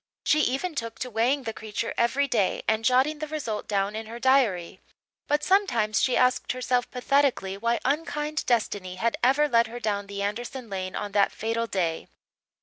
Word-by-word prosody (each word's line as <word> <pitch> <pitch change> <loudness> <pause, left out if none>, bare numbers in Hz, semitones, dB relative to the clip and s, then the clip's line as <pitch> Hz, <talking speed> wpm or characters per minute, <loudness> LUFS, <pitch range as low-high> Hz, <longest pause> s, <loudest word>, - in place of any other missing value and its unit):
She 305 - +4
even 300 +6 0
took 230 -5 -4
to 250 - -5
weighing 245 +5 +1
the 225 -2 -4
creature 220 +1 -4
every 265 +4 +2
day 220 -7 0
and 220 0 +1
jotting 260 +6 +3
the 310 - -4
result 275 -9 -4
down 200 0 0
in 220 0 -5
her 230 +1 -7
diary; 240 -10 +2 0.5
but 295 +1 +1
sometimes 240 - +2
she 255 - +2
asked 250 0 +2
herself 250 -1 0
pathetically 250 -6 +1
why 235 +4 0
unkind 300 +1 -1
destiny 205 -6 0
had 230 +5 0
ever 275 +4 +4
led 235 -4 +3
her 240 +2 -7
down 205 -3 -2
the 200 0 -4
Anderson 235 +3 -4
lane 185 -1 -4
on 205 -1 -4
that 200 0 +3
fatal 230 +1 -2
day. 170 -6 -2
235 Hz, 180 wpm, -26 LUFS, 210-270 Hz, 0.5 s, She